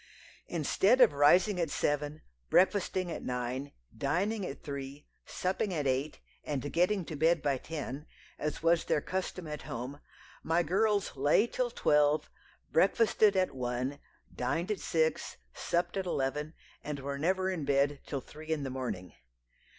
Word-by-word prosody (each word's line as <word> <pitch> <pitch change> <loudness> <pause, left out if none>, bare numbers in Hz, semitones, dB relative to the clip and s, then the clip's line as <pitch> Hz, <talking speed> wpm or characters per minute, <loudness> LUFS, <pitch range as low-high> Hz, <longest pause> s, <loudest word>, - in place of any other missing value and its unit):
"Instead 190 - +2
of 245 - +7
rising 180 +7 +4
at 165 -3 0
seven, 150 +1 -1 0.3
breakfasting 185 - +2
at - - -4
nine, 125 +3 -3 0.2
dining 205 +5 0
at 145 -6 -6
three, 140 0 -6 0.2
supping 190 +2 -1
at 155 -5 -1
eight, 135 +3 -1 0.2
and 145 -1 -3
getting 180 +2 +2
to 155 - -6
bed 160 +2 +2
by 140 -1 +2
ten, 150 -1 -6 0.3
as 150 +1 -3
was 165 0 +3
their - - +2
custom 185 +2 -4
at 150 -1 -5
home, 130 +5 -6 0.4
my 165 +2 +2
girls 200 +3 +1
lay 145 - +4
till 245 +1 -1
twelve, 150 -8 +2 0.4
breakfasted 205 +3 +4
at 185 -1 +1
one, 125 +2 -2 0.3
dined 165 +10 -1
at 210 - -1
six, 160 -1 0 0.2
supped 175 +1 -1
at 190 -1 -2
eleven, 150 +1 -2 0.3
and 150 -1 -4
were 140 +1 -4
never 185 +4 +1
in 170 -5 -3
bed 140 0 +1
till 140 -3 -3
three 155 +4 -12
in 155 -3 0
the 135 - -3
morning. 115 -9 -4
155 Hz, 150 wpm, -31 LUFS, 140-185 Hz, 0.4 s, of